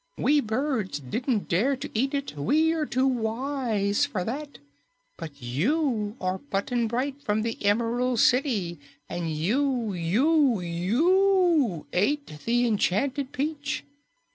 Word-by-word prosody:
We 295 +1 +3
birds 225 - -1
didn't 220 - -2
dare 235 +11 +2
to 260 - -6
eat 270 +6 0
it; 280 - -4
we 305 - +2
are 310 -2 -1
too 260 +2 +1
wise 230 -4 0
for 185 - -1
that. 285 +7 -5 0.6
But 145 -3 -9
you 210 - 0
are 185 +1 -2
Button 235 -1 -1
Bright 265 +5 -2
from 215 -4 0
the 230 -1 -4
Emerald 235 +4 +1
City, 215 - +2 0.3
and 170 -2 -3
you, 225 - 0
YOU, 245 - +2
YOU 295 - +2
ate 205 - 0
the 240 +1 +2
enchanted 250 +5 0
peach! 290 +1 -3
240 Hz, 125 wpm, -26 LUFS, 200-280 Hz, 0.6 s, We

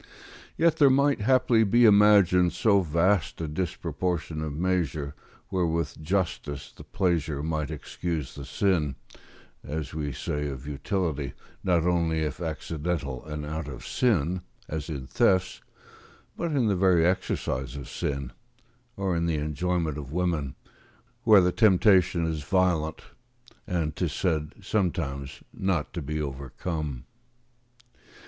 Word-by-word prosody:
Yet 165 -1 +3
there 145 -3 +6
might, 140 -1 +3
haply, 125 -1 +4
be 120 +3 +4
imagined 100 -5 +6
so 100 +2 +3
vast 85 +2 +1
a 80 - -2
disproportion 85 0 -2
of 80 -1 -3
measure, 80 -5 -1 0.4
where 90 -2 +1
with 80 -4 -2
justice 80 -5 -2
the - - -13
pleasure 80 -6 -1
might 80 -2 -2
excuse 80 -3 -4
the 70 - -8
sin, 75 -1 0 0.7
as 75 -2 -5
we 75 -2 -3
say 75 +1 -3
of 70 -1 -6
utility; 75 -1 -2 0.3
not 85 -3 +2
only 85 -2 +1
if 75 +2 -4
accidental 80 -3 -3
and 75 -1 -5
out 80 0 -4
of 65 -3 -8
sin, 90 - +1 0.3
as 80 +1 -4
in 70 -5 -4
thefts, 95 +8 +1 0.7
but 170 -1 -2
in 135 -5 +2
the 105 -3 +2
very 90 -3 +4
exercise 70 -7 -1
of 70 -2 -7
sin, 70 -3 -3 0.7
or 95 -3 0
in 85 0 0
the 80 - +1
enjoyment 75 +1 -1
of 70 -2 -8
women, 85 -5 -1 0.7
where 105 -4 +8
the 90 0 +2
temptation 95 -4 +4
is 80 -2 -2
violent, 80 -1 +1 0.6
and, 80 -4 -1
'tis - - -1
said, 80 -4 -1
sometimes 75 -9 -2
not 95 -6 -1
to 85 - -3
be 75 +2 -3
overcome. 70 0 -4
80 Hz, 135 wpm, -27 LUFS, 75-95 Hz, 0.7 s, where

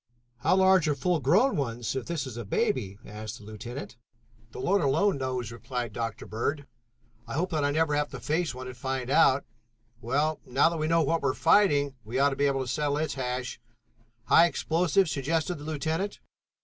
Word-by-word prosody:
"How 125 - +2
large 190 -3 +5
are 150 - +2
full 165 +5 0
grown 195 - +3
ones 120 -4 -2
if 130 - -4
this 170 -4 -2
is 130 -4 -7
a 120 - -5
baby?" 100 -1 -1
asked 110 +2 -7
the - - -15
lieutenant. 115 +5 -8 0.5
"The - - -10
Lord 195 +7 +2
alone 155 +5 +2
knows," 130 -4 -3
replied 120 -1 -5
Dr. 115 -1 -4
Bird. 140 +7 -2 0.6
"I - - -5
hope 180 +5 -1
that 155 -3 0
I 145 - +2
never 155 +1 +1
have 150 0 0
to - - -8
face 160 -2 -1
one 130 0 -7
and 130 -1 -7
find 130 0 -3
out. 135 0 +4 0.6
Well, 145 +6 0
now 135 +5 +3
that 170 - -4
we 155 0 -1
know 165 0 +3
what 165 +3 +1
we 140 - +1
are - - -2
fighting, 145 -6 +3
we 115 +4 -4
ought 140 +1 +4
to - - -2
be 140 +1 +2
able 135 -1 0
to 130 - -4
settle 145 +2 0
its 155 +1 -1
hash." 125 -1 -4 0.6
"High 165 +8 +6
explosive?" 170 +3 +1
suggested 155 +3 -1
the 145 - -9
lieutenant. 160 +6 -2
140 Hz, 200 wpm, -28 LUFS, 125-160 Hz, 0.6 s, High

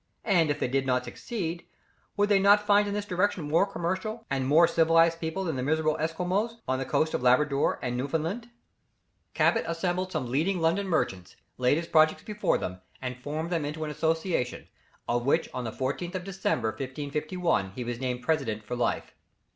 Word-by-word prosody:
And 175 -7 +3
if 145 - -1
they - - 0
did 135 +1 0
not 125 -1 +1
succeed, 175 -8 -4 0.5
would 205 0 +3
they 205 -1 +4
not 205 +1 +5
find 205 0 +4
in 200 - -2
this 205 0 -2
direction 185 -3 0
more 165 +6 +3
commercial, 195 +5 -3
and 130 -1 0
more 160 +4 +6
civilized 165 0 +4
people 165 +4 -3
than 160 -7 -2
the - - -1
miserable 155 +3 +1
Esquimaux 180 +8 -1
on 130 0 0
the 135 - -2
coast 155 +4 +1
of - - -1
Labrador 140 +3 +3
and 125 -1 -1
Newfoundland? 160 - -2 0.9
Cabot - - +3
assembled 180 +2 -1
some 130 -8 -3
leading 170 +8 +1
London 170 +5 +1
merchants, 95 - -1 0.2
laid 125 +3 +3
his 170 - -2
projects 155 -1 +3
before 210 -1 0
them, 90 0 -5 0.2
and 125 -1 -4
formed 155 +5 -4
them 165 -3 0
into 150 +2 -4
an 150 - -3
association, 160 -3 -1 0.4
of 120 0 0
which 160 +4 +3
on 125 -1 -4
the 110 - -3
14th 140 - -3
of 185 - -3
December, 185 - -1
1551, 140 - -2
he 125 - -4
was 120 0 -4
named 125 -1 -3
president 125 -8 0
for 125 +4 -4
life. 120 -1 -1
160 Hz, 185 wpm, -28 LUFS, 130-185 Hz, 0.9 s, more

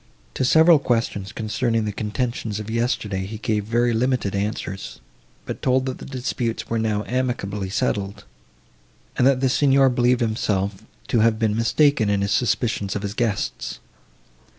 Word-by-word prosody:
To - - -1
several 160 +4 +6
questions, 115 -6 -1
concerning 115 0 -1
the 105 - -2
contentions 110 0 -3
of 105 +1 -6
yesterday, 105 -5 -1
he 110 +2 -6
gave 105 -1 -1
very 120 +2 +1
limited 125 -3 0
answers; 100 -1 -4 0.5
but - - -6
told, 130 0 +2
that 130 -1 -4
the - - -8
disputes 125 -3 -3
were 115 - -1
now 105 -2 0
amicably 110 -6 -2
settled, 100 0 -2 0.9
and 125 - +3
that 135 -2 +3
the 135 - +3
Signor 135 0 +4
believed 125 0 +2
himself 100 -4 -1 0.3
to 115 - +2
have 110 0 +3
been 110 -1 +1
mistaken 115 0 +3
in 100 -1 +1
his 100 - -1
suspicions 110 -5 0
of 105 - -3
his 100 0 -3
guests. 110 -3 -2
115 Hz, 155 wpm, -22 LUFS, 105-125 Hz, 0.9 s, several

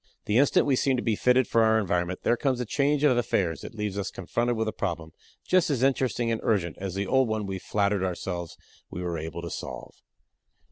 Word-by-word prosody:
The 105 +3 +3
instant 140 - +4
we 140 - +3
seem 135 +1 +2
to - - -2
be 115 -3 +1
fitted 125 +2 +3
for 115 - +3
our 110 0 +4
environment 90 -3 -1
there - - +3
comes 130 0 0
a 125 - -2
change 145 +5 +1
of 140 -4 +5
affairs 95 -8 0
that - - -9
leaves 105 -2 -3
us 95 - -2
confronted 120 +6 -2
with 110 0 -1
a - - 0
problem 80 -6 -4 0.3
just 185 -2 +3
as 130 -4 0
interesting 130 -3 +1
and 115 - -1
urgent 90 -6 0
as 95 -1 -4
the 100 +1 -1
old 130 +4 +3
one 110 -1 -2
we 95 -1 -4
flattered 100 0 0
ourselves 85 -2 -4 0.3
we 90 - -6
were 85 -2 -2
able 80 +2 -6
to 85 - -5
solve. - - -7
110 Hz, 225 wpm, -27 LUFS, 90-125 Hz, 0.3 s, of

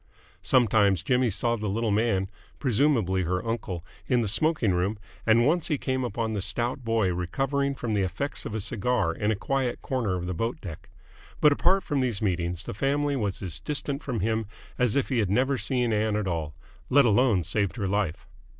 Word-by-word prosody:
Sometimes 105 -6 +3
Jimmy 125 -2 +2
saw 120 +4 0
the 105 -2 -3
little 110 +2 0
man 100 -3 +1 0.3
presumably 115 -7 +2
her 90 +4 -1
uncle 95 -7 -3 0.2
in 125 -2 +3
the 110 - -1
smoking 120 - +2
room, 95 +5 0 0.3
and 115 +2 +5
once 170 +3 +2
he 150 -5 0
came 130 -1 -1
upon 115 -1 -2
the 105 -2 -2
stout 120 +6 -1
boy 115 -5 +1
recovering 135 +10 -1
from 120 -4 -3
the 105 - +2
effects 95 - -3
of 110 - -5
a - - -1
cigar 105 -3 0
in 105 +5 -1
a 110 - +2
quiet 130 +3 -1
corner 120 -8 -1
of 90 -1 -3
the 90 - -2
boat 115 +7 -2
deck: 85 -6 -9 0.5
but 150 - +6
apart 185 +6 +3
from 145 - -1
these 120 -6 0
meetings 90 -3 -1
the - - -6
family 140 +6 0
was 105 -6 -2
as 90 -4 -4
distant 145 -1 -2
from 125 -8 -3
him 110 +1 0 0.3
as 125 -4 +2
if 140 - +1
he 130 -4 +1
had 105 -4 +1
never 130 +7 +2
seen 120 0 0
Ann 105 0 +1
at 105 -2 -1
all 80 -4 -3 0.3
let 140 0 +6
alone 110 -4 +3
saved 100 +5 -1
her 100 -5 -2
life. 95 -2 -1
110 Hz, 200 wpm, -27 LUFS, 95-130 Hz, 0.5 s, but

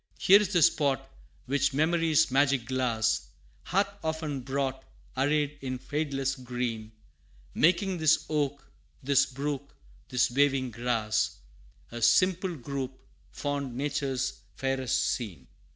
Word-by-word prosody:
Here 200 +3 +6
is 205 -2 -2
the 175 -5 +4
spot 145 - +2 0.3
which 140 0 +1
memory's 160 -1 +3
magic 135 -2 +2
glass 115 - 0 0.4
Hath 195 +2 +2 0.2
often 160 -3 -2
brought, 135 0 -2 0.3
arrayed 145 +2 0
in 130 -1 -3
fadeless 135 -1 -2
green, 120 -3 -4 0.6
Making 180 +2 +2
this 160 0 +3
oak, 145 -2 -1 0.4
this 140 0 +3
brook, 140 +1 -4 0.3
this 125 -1 +2
waving 135 -1 +2
grass 115 -2 -1 0.5
A 120 0 -6
simple 180 - +3
group 135 -1 -5 0.3
fond 140 -3 -3
Nature's 135 -2 -2 0.2
fairest 135 -2 0
scene. 90 - -4
135 Hz, 115 wpm, -28 LUFS, 125-150 Hz, 0.6 s, Here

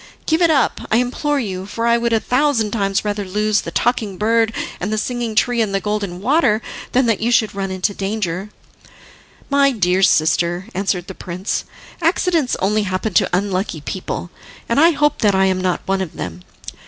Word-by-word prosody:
Give 320 +2 +1
it 340 - +5
up, 285 -5 +2
I 220 - +3
implore 275 +4 0
you, 190 -5 -4
for 230 +3 -3
I 235 0 +3
would 235 0 0
a 225 - +3
thousand 250 -4 +1
times 195 -2 0
rather 205 0 -1
lose 210 +2 0
the - - -6
Talking 220 -6 0
Bird, 225 +2 +2 0.3
and 195 +4 -3
the 215 - 0
Singing 235 0 -2
Tree 240 +2 +2
and 200 -3 0
the - - +2
Golden 200 -3 -3
Water, 255 -4 +3 0.3
than 255 +1 +3
that 225 -4 +1
you 235 +2 0
should 220 -4 +2
run 195 -1 -3
into 190 +2 -1
danger." 195 -1 -3 1.0
"My 280 0 +4
dear 190 -5 +1
sister," 175 +1 +2
answered 185 -2 -1
the 190 - -8
prince, 185 +2 -4 0.4
"accidents 330 -4 +1
only 210 +3 +1
happen 190 +1 -2
to - - +3
unlucky 185 -3 -1
people, 180 +2 -5 0.4
and 235 - +2
I 330 +3 +7
hope 295 -2 +1
that 205 -3 +3
I 190 0 +4
am 185 -1 +1
not 185 -1 0
one 195 0 0
of 180 -4 -5
them. 90 -1 -6
210 Hz, 190 wpm, -19 LUFS, 190-240 Hz, 1.0 s, I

